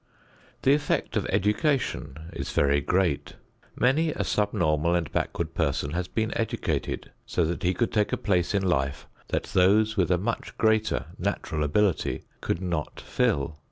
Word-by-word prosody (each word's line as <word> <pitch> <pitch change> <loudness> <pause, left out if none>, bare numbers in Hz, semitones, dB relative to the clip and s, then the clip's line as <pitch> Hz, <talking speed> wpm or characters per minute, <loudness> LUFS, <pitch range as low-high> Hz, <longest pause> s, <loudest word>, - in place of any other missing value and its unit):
The 135 - +5
effect 145 0 0
of - - 0
education 105 - 0 0.2
is - - -5
very 70 0 +3
great. 90 -2 0 0.4
Many 150 +6 +3
a - - -2
subnormal 85 -6 +1
and 85 -3 -1
backward - - -2
person 70 - 0
has 90 +2 -2
been 110 +3 -2
educated 115 - -2 0.2
so 85 - +1 0.2
he 90 +1 +1
could 120 - 0
take 105 -2 +2
a - - +1
place 90 -1 +1
in 100 - +1
life 70 -6 0 0.2
that - - -1
those 105 +4 +4
with 90 -4 +2
a 90 - +3
much 115 +6 -3
greater 110 -1 +2
natural 75 -1 -1
ability 90 +5 +1 0.2
could 90 - -2
not 85 -4 -3
fill. 75 +2 0
95 Hz, 155 wpm, -27 LUFS, 80-110 Hz, 0.4 s, The